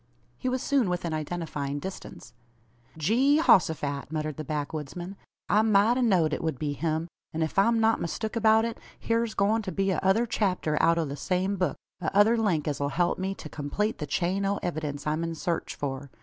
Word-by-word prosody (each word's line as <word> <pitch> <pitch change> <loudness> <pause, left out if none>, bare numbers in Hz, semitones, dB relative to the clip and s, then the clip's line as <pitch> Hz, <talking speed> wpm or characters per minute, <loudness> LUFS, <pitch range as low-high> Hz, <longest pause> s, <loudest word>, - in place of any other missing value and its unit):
He 255 - -2
was 255 0 -1
soon 270 -8 +2
within 175 -2 -2
identifying 155 -3 -3
distance. 145 -7 -8 0.6
"Gee 250 - +3
hosophat!" 155 - +2
muttered 155 -2 -3
the 155 - -4
backwoodsman; 155 +5 -4 0.3
"I 210 - +4
mout 220 +1 +4
a 255 - 0
know'd 180 -10 +3
it - - -3
wud 160 -5 -1
be 145 +2 -2
him; 160 +2 -1 0.3
an 160 - +1
ef 160 +4 0
I'm 230 +3 +4
not 225 0 +3
mistook 215 +7 -3
about 220 0 +4
it, 230 - -4 0.3
hyurs 230 -1 +1
goin' 210 +3 +2
to 195 -3 -5
be 195 0 0
a - - 0
other 195 +5 +3
chapter 190 -8 0
out 165 0 +4
o' 165 - +1
the 140 -1 -5
same 185 +5 -1
book 185 -2 -1 0.2
a 160 - 0
other 215 +3 +6
link 190 -10 +1
as 145 - -1
'll 140 - +1
help 175 +5 0
me 190 +1 -2
to - - -9
kumplete 155 +10 -2
the 150 - -4
chain 180 +6 0
o' 200 +1 +1
evydince 150 -4 -3
I'm 155 +2 0
in 165 0 -3
sarch 170 +1 -2
for. 140 0 -4
175 Hz, 205 wpm, -27 LUFS, 155-215 Hz, 0.6 s, other